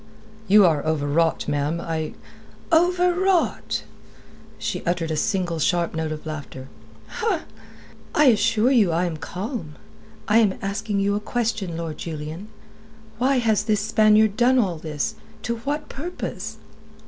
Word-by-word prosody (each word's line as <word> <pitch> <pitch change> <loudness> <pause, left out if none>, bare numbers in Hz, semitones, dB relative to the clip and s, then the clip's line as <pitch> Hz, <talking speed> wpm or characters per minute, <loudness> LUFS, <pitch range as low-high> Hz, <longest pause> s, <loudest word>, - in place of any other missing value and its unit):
"You 205 0 +7
are 160 -4 +2
overwrought, 160 +1 +1
ma'am. 145 +3 0
I...." 160 -2 -3 0.6
"Overwrought!" 360 +2 +2 0.7
She - - -3
uttered 170 -2 -1
a - - 0
single 180 -2 -1
sharp 170 +2 +1
note 160 -1 -2
of 155 0 -6
laughter. 140 -4 -7 1.5
"I 300 - +5
assure 230 0 +4
you 215 -9 +4
I 170 +2 +1
am 165 -3 -3
calm. 180 - -5 0.5
I 220 +2 +5
am 205 -4 +2
asking 200 +1 -2
you 200 0 +1
a 205 - 0
question, 215 -6 -2
Lord 165 -2 -5
Julian. 160 +4 -6 0.7
Why 265 +2 +3
has 225 -4 +2
this 210 -2 +1
Spaniard 215 -1 +4
done 245 +3 +4
all 190 -9 +1
this? 155 -3 -3 0.3
To 235 -1 -2
what 290 +5 -3
purpose?" 345 +6 -6
200 Hz, 135 wpm, -23 LUFS, 160-230 Hz, 1.5 s, You